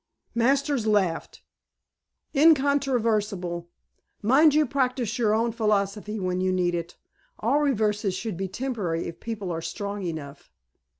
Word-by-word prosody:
Masters 270 0 +1
laughed. 195 -6 0 0.9
"Incontrovertible. 230 - +2 0.5
Mind 285 +7 +5
you 305 0 +4
practice 250 -3 -1
your 215 -2 +3
own 230 +1 +1
philosophy 210 -1 -1
when 185 -1 -1
you 185 0 +1
need 180 -1 +1
it. 170 0 -4 0.4
All 255 +7 +1
reverses 210 -7 +1
should 215 0 -4
be 190 +2 -3
temporary 195 -6 -3
if 170 0 -7
people 210 -5 -4
are 165 -1 -3
strong 200 +5 -4
enough." 155 -5 -6
210 Hz, 125 wpm, -26 LUFS, 185-250 Hz, 0.9 s, Mind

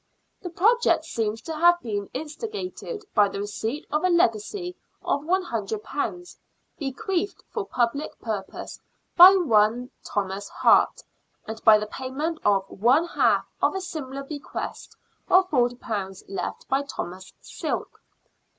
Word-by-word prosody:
The 360 - -5
project 450 +8 +3
seems 220 -1 -2
to 320 - -5
have 345 +2 +5
been 205 - -4
instigated 415 - -6
by 205 -1 +4
the 200 - -5
receipt 220 +6 -4
of 300 +3 0
a 365 - +3
legacy 345 - +1 0.3
of 285 - 0
£100, 295 - -3 0.4
bequeathed 340 +7 -2
for 425 -3 -3
public 250 +5 -1
purposes 205 -4 -5 0.4
by 365 +2 +10
one 245 - +2
Thomas 200 0 -3
Hart, - - +3 0.4
and 220 0 -7
by 220 -2 +8
the 210 - -3
payment 275 +8 -4
of 195 -2 +3
one 250 - +3
half - - +2 0.2
of - - +2
a - - 0
similar 275 -7 -6
bequest 290 +1 -7 0.3
of 370 0 +5
£40 235 -7 -1
left 195 - -5
by 270 +1 +1
Thomas 185 -9 -7
Silk. - - -5
270 Hz, 130 wpm, -25 LUFS, 215-345 Hz, 0.4 s, by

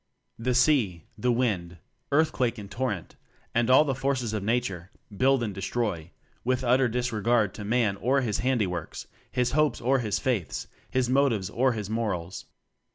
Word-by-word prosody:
The 125 +2 0
sea, 125 - +3
the 125 - +1
wind, 100 -9 -1 0.3
earthquake 135 -5 +2
and 100 -1 -9
torrent, 105 -5 -3 0.4
and 120 +1 +2
all 130 +4 +7
the 135 - 0
forces 130 -4 -1
of 105 - -1
Nature 100 -5 -1 0.3
build 130 +3 +3
and 105 -3 -3
destroy, 95 -4 -2 0.3
with 130 +1 0
utter 125 +1 +3
disre 120 -2 -2
gard 115 -3 +2
to 105 - -7
Man 105 -2 +1
or 130 +6 +2
his 110 -5 -1
handiworks, 105 -9 -1 0.3
his 125 -1 +1
hopes 150 -4 +2
or 130 +3 +2
his 110 -4 -1
faiths, 120 - -2 0.2
his 130 -1 +1
motives 125 -7 +2
or 130 +2 +2
his 105 -3 -4
morals. 100 -5 -3
120 Hz, 160 wpm, -27 LUFS, 105-130 Hz, 0.4 s, all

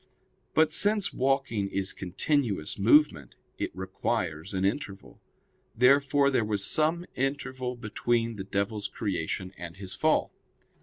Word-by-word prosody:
But 155 0 +4
since 205 +2 +3
walking 130 -6 0
is 95 0 -2
continuous 100 - -1
movement, 100 - +4 0.2
it - - -1
requires 95 -2 -3
an 95 -1 -1
interval. 100 -2 -4 0.6
Therefore 140 +2 +4
there 125 -4 +2
was 105 -2 0
some 160 +3 +2
interval 130 -2 -2
between 115 +1 -1
the 95 - -5
devil's 100 +2 -2
creation 95 -1 -3
and 85 0 -8
his 95 -2 -6
fall. - - +1
110 Hz, 120 wpm, -28 LUFS, 95-135 Hz, 0.6 s, But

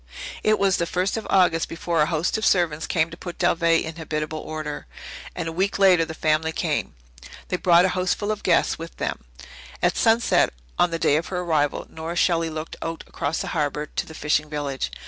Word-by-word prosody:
It 215 0 +3
was 195 -2 +2
the 170 - -1
first 185 +3 0
of 225 - -4
August 175 -3 +3
before 165 -1 -1
a 150 - +3
host 160 +1 0
of 220 - -2
servants 165 -6 +2
came 160 -1 +1
to - - -9
put 175 -2 -7
Dalveigh 170 -2 +3
in 160 0 -7
habitable 155 -1 -3
order, 155 -2 -6 0.5
and 170 -2 -3
a - - -2
week 190 +4 0
later 185 -4 +5
the 160 - -7
family 155 +1 +1
came. - - -2 0.5
They 180 - 0
brought 175 0 +5
a - - +2
houseful 185 +3 0
of 215 - -3
guests 170 -2 +2
with 165 0 -8
them. - - -3 0.6
At - - +2
sunset 230 - +3 0.3
on 175 - +4
the 165 - -2
day 150 -2 +3
of 165 - -3
her 180 -1 -3
arrival 155 -4 0
Nora 160 +2 -6
Shelley 165 -2 +2
looked 155 0 -6
out 165 0 -4
cross 145 +3 -2
the - - -4
harbour 150 -1 -1
to - - -4
the 160 - -10
fishing 150 0 0
village. 145 -3 -3
165 Hz, 205 wpm, -24 LUFS, 155-180 Hz, 0.6 s, later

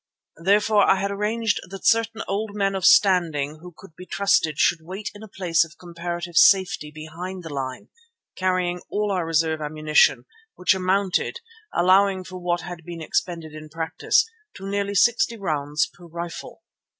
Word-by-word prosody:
Therefore 205 +2 +4
I - - +6
had 200 +1 -2
arranged 215 +2 0
that 195 0 -9
certain 225 0 +2
old 205 +1 -3
men 195 -1 0
of 190 -2 -2
standing 160 -6 +3
who 180 +1 -10
could 180 -5 -15
be 180 - -11
trusted 180 -6 +1
should 170 +1 +3
wait 190 +6 -6
in 205 - -13
a 220 - -9
place 175 -4 +1
of 165 0 -13
comparative 175 0 -6
safety 190 -3 +4
behind 165 +5 -8
the 160 -3 -7
line, 130 -2 -5 0.5
carrying 180 -1 0
all 210 0 -1
our 180 -4 -1
reserve 160 -1 +1
ammunition, 150 -4 +2 0.3
which 180 - +3
amounted, 190 - 0 0.4
allowing 190 +2 +3
for 185 0 -9
what 175 -1 -1
had 175 -1 -8
been 170 0 -8
expended 165 0 -3
in 155 0 -10
practice, 160 0 +1 0.3
to 195 - -8
nearly 200 0 -2
sixty 235 +2 +3
rounds 150 -6 -1
per 175 -1 -15
rifle. 170 +1 -8
180 Hz, 160 wpm, -23 LUFS, 160-195 Hz, 0.5 s, I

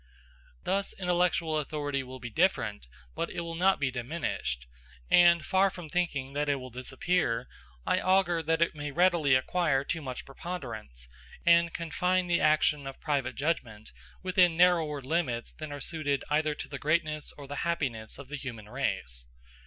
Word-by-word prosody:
Thus 195 +1 -1
intellectual 175 -3 +1
authority 145 -2 -2
will 130 0 -9
be 120 -1 -7
different, 110 - +1 0.3
but - - -2
it - - -4
will 170 0 -5
not 185 +3 +3
be 135 -2 0
diminished; 120 - -3 0.5
and 170 -3 +6
far 190 +1 +3
from 175 -4 -9
thinking 140 -6 -1
that 145 +1 0
it 145 - +3
will 130 -1 -8
disappear, 130 +1 -1 0.4
I - - +2
augur 185 -3 +3
that 165 +1 +2
it 170 - -1
may 145 -1 -5
readily 170 -3 +4
acquire 140 0 +1
too 165 +3 -2
much 130 -3 -6
preponderance, 120 - -6 0.4
and 170 0 +5
confine 180 +3 0
the 175 -1 +1
action 150 -2 +3
of 135 - -8
private 135 -5 -1
judgment 120 -8 -2 0.3
within 180 -2 +4
narrower 165 -5 +4
limits 130 -4 -1
than 155 -1 -7
are 145 - -5
suited 145 -1 -1
either 155 0 +2
to - - -6
the 140 - -6
greatness 155 -1 0
or 145 - -9
the 145 +1 -6
happiness 130 -10 -2
of 140 -1 -10
the 150 +2 -5
human 120 -6 -7
race. - - -2
150 Hz, 165 wpm, -29 LUFS, 130-170 Hz, 0.5 s, and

